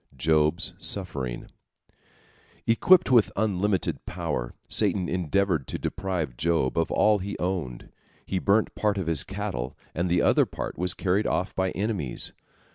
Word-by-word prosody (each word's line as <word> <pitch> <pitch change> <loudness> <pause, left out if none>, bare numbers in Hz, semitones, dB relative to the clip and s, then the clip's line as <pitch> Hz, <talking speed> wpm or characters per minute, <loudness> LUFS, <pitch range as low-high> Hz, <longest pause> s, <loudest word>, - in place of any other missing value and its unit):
JOB'S 75 +5 +2
SUFFERING 70 -11 -2 1.2
Equipped 175 +8 +5
with 120 -4 +5
unlimited 100 -2 0
power, - - -3
Satan 90 -3 +2
endeavored 90 -4 0
to - - -3
deprive 85 -9 -3
Job 80 -5 +1
of 80 -1 +1
all 105 -1 +4
he 100 +2 -5
owned. 85 -10 -3 0.4
He 95 - -1
burnt 105 +3 +2
part 105 -1 0
of 95 - -2
his 80 -5 +1
cattle, 60 +1 -4 0.2
and 85 +2 -1
the 85 0 +2
other - - +4
part - - -5
was 90 +1 -1
carried 95 +3 +1
off 95 - -1
by 95 0 +1
enemies. 100 - -2
90 Hz, 140 wpm, -26 LUFS, 75-100 Hz, 1.2 s, Equipped